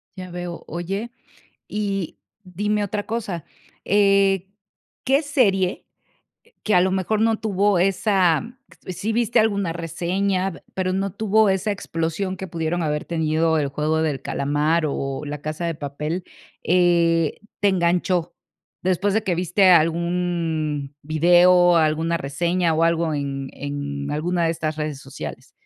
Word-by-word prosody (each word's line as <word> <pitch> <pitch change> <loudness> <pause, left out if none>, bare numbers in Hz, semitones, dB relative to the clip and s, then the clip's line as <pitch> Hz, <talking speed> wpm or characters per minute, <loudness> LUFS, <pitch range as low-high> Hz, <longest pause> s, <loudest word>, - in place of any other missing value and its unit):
Ya 185 -2 -8
veo. 175 -1 -6
Oye, 195 +8 -4 0.6
y 200 -4 -3 0.3
dime 205 +3 -1
otra 205 +1 -3
cosa, 210 -8 -4 0.4
eh, 195 -2 +3 0.6
¿qué 275 +4 +3
serie, 200 -11 +1 0.6
eh, - - -29
que 210 - +1
a 180 - +6
lo 190 - +2
mejor 190 +3 0
no 225 0 +2
tuvo 205 -2 +1
esa 190 -2 +2 0.4
sí 185 +5 -3
viste 235 0 +2
alguna 200 -6 +1
reseña, 185 +3 -2
pero 185 -1 -1
no 195 0 -1
tuvo 220 0 +3
esa 190 +2 0
explosión 185 0 -3
que 190 - -6
pudieron 165 +1 -2
haber 150 -1 -1
tenido 160 -1 +1
El 145 -2 0
juego 155 +3 0
del 145 -4 -1
calamar 150 +4 0
o 135 -1 -3
La 145 0 -5
casa 155 +3 -3
de 165 - -2
papel, 150 +5 -4 0.4
eh, 170 -2 +2 0.2
te 205 - +4
enganchó?, 180 -1 +1 0.5
después 185 +2 +1
de 220 - +2
que 185 - +1
viste 185 +2 +3
algún 165 -3 +1
video, 175 +3 +5
alguna 160 +1 +2
reseña 170 +4 0
o 160 - +1
algo 165 -1 +1
en 140 -2 -3
en 145 0 -5
alguna 170 +4 0
de 165 - +2
estas 155 -1 -3
redes 150 -3 -4
sociales. - - -8
175 Hz, 140 wpm, -22 LUFS, 160-195 Hz, 0.6 s, a